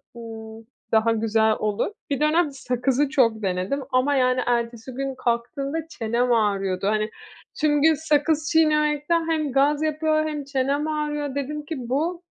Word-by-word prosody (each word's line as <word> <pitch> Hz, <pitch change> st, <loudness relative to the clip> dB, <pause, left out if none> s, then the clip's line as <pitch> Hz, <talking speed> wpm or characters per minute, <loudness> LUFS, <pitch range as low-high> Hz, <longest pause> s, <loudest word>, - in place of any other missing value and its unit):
ımm, 225 Hz, -1 st, -9 dB, 0.3 s
daha 225 Hz, +1 st, +3 dB
güzel 220 Hz, 0 st, +2 dB
olur. 210 Hz, -, -1 dB, 0.2 s
Bir 280 Hz, -, -1 dB
dönem 305 Hz, +1 st, +2 dB
sakızı 265 Hz, +1 st, 0 dB
çok 235 Hz, -7 st, +2 dB
denedim 190 Hz, +9 st, -1 dB
ama, 260 Hz, +3 st, +2 dB
yani, 255 Hz, -1 st, +2 dB
ertesi 235 Hz, 0 st, -1 dB
gün 270 Hz, +1 st, -3 dB
kalktığımda 275 Hz, +6 st, -2 dB
çenem 240 Hz, -2 st, -1 dB
ağrıyordu. 195 Hz, -3 st, 0 dB
Hani 215 Hz, 0 st, +1 dB, 0.5 s
tüm 295 Hz, -1 st, +3 dB
gün 320 Hz, +1 st, +6 dB
sakız 305 Hz, +1 st, +1 dB
çiğnemekten 305 Hz, +1 st, +2 dB
hem 310 Hz, -3 st, 0 dB
gaz 285 Hz, +3 st, +2 dB
yapıyor 310 Hz, 0 st, +1 dB
hem 300 Hz, -2 st, -4 dB
çenem 280 Hz, +2 st, -1 dB
ağrıyor. 295 Hz, -2 st, -2 dB
Dedim 295 Hz, +2 st, -4 dB
ki 320 Hz, -, -4 dB
“Bu 330 Hz, +7 st, -1 dB
275 Hz, 145 wpm, -24 LUFS, 235-300 Hz, 0.5 s, gün